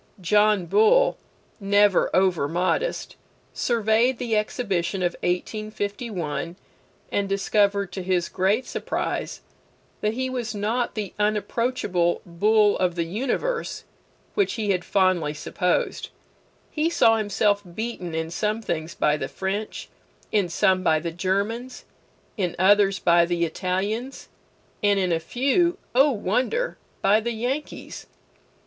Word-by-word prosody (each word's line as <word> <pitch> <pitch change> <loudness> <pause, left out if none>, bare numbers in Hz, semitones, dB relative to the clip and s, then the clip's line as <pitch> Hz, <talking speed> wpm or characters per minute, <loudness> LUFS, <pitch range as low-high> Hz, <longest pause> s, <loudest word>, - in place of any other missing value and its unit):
John 210 +1 +3
Bull, 220 - +4 0.4
never 205 -1 +3
over 185 -6 +2
modest, 185 - -1 0.4
surveyed 235 +2 +2
the 230 -2 -1
Exhibition 195 -4 -1
of 175 - +1
1851, 200 -3 -3 0.6
and 200 -1 0
discovered, 200 0 +1
to 190 - -5
his 180 -1 0
great 200 +7 +1
surprise, - - -3 0.6
that 210 +1 0
he 260 +1 -1
was 240 -4 -4
not 225 +4 -1
the 210 -3 -4
unapproachable 210 -3 0
Bull 205 +4 +3
of 180 -2 +1
the 170 - 0
universe 265 - -2 0.5
which 405 -2 +1
he 210 -3 -1
had 180 -2 0
fondly 180 -7 +1
supposed. 180 +4 -1 0.6
He 310 +2 0
saw 225 -9 +4
himself 205 -1 +1
beaten 215 -7 -4
in 160 0 -3
some 210 +4 -1
things 160 -3 -3
by 150 0 +2
the 135 - -3
French, 195 +6 -4 0.4
in 200 -4 +1
some 185 +2 +2
by 160 -3 +3
the 170 +1 -4
Germans, 200 +8 -2 0.5
in 180 -4 -1
others 195 +1 +4
by 170 -1 +4
the 170 -1 0
Italians, 200 +10 -3 0.5
and 205 -1 +3
in 185 -2 0
a 165 - +2
few 275 - +1 0.2
(O 270 +4 +5
wonder!) 255 - -1 0.2
by 200 +2 +5
the 235 +2 -3
Yankees. 250 +7 -4
205 Hz, 125 wpm, -24 LUFS, 180-225 Hz, 0.6 s, O